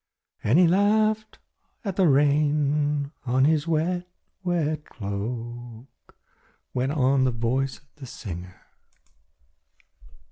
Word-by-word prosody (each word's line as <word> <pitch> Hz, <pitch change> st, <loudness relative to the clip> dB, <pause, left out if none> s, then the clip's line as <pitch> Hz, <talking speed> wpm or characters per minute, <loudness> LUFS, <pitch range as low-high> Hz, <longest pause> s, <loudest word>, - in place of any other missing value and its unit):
"And 115 Hz, +8 st, +3 dB
he 180 Hz, -1 st, +6 dB
laughed 215 Hz, +4 st, +2 dB, 0.5 s
at 195 Hz, -3 st, -2 dB
the 190 Hz, -2 st, +4 dB
rain 145 Hz, 0 st, +2 dB
on 130 Hz, +1 st, +2 dB
his 155 Hz, +1 st, +2 dB
wet, 175 Hz, +3 st, 0 dB, 0.3 s
wet 155 Hz, -4 st, 0 dB
cloak," 120 Hz, +3 st, -7 dB, 0.6 s
went 130 Hz, +2 st, 0 dB
on 135 Hz, -2 st, +3 dB
the 130 Hz, -, +3 dB
voice 125 Hz, +3 st, -1 dB
of -, -, -26 dB
the 135 Hz, -3 st, -9 dB
singer. 90 Hz, -5 st, -8 dB
145 Hz, 105 wpm, -25 LUFS, 125-165 Hz, 0.6 s, he